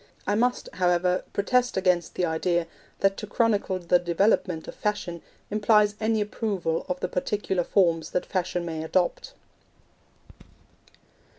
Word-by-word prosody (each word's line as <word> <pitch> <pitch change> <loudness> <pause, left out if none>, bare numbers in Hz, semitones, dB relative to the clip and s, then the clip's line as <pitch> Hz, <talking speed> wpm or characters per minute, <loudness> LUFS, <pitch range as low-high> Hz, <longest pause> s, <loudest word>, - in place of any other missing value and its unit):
I 205 - +1
must, 245 +4 +1
however, 180 0 +1
protest 250 +4 +1
against 180 -3 +1
the 180 - +1
idea 170 +1 0 0.4
that 195 0 +3
to 210 - -6
chronicle 205 -3 +1
the 175 0 +2
development 175 -1 +1
of - - -7
Fashion 185 -5 -3 0.3
implies 210 0 +4
any 220 0 +1
approval 205 -2 -2
of 275 0 -2
the - - 0
particular 190 -1 -1
forms 170 -4 +2
that 180 - -1
Fashion 180 -2 -2
may 160 -2 -4
adopt. 175 +2 -1
185 Hz, 130 wpm, -26 LUFS, 175-210 Hz, 0.4 s, implies